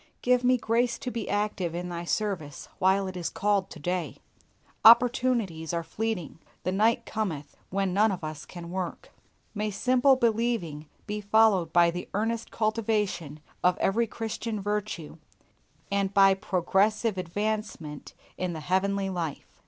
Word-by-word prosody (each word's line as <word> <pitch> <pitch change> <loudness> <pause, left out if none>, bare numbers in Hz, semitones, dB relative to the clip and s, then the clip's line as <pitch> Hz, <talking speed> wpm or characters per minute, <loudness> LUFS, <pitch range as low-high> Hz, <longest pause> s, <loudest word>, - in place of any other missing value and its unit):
Give 250 0 +3
me 250 +1 +4
grace 235 +1 +1
to 250 - -5
be 230 -3 -4
active 205 -5 -1
in 180 +1 -4
Thy 170 0 -5
service 175 -8 -3
while 190 +1 +3
it 185 -1 -5
is 175 -2 -2
called 200 -1 0
to - - -10
day. 175 +3 -3 0.7
Opportunities 235 -8 +4
are 170 - -1
fleeting. 205 -5 -3 0.2
The 185 - 0
night 220 +4 +2
cometh 175 -10 -4
wherein 195 -1 0
none 210 +3 +4
of 185 -4 -5
us 155 -2 -6
can 170 -1 -9
work. 185 -2 -5 0.4
May 210 0 -1
simple 255 +6 +3
believing 225 - 0 0.2
be 210 0 -4
followed 205 -5 +3
by 170 0 +5
the 175 +1 -6
earnest 225 +2 -1
cultivation 210 -9 -1 0.2
of 180 0 +4
every 230 +4 +1
Christian 225 0 -4
virtue, 205 -6 -3 0.7
and 200 -1 +1
by 195 -1 +6
progressive 195 +2 +1
advancement 195 -5 -4 0.2
in 180 -1 -1
the 160 - -5
heavenly 195 +4 0
life. 165 -5 -4
200 Hz, 145 wpm, -27 LUFS, 175-220 Hz, 0.7 s, by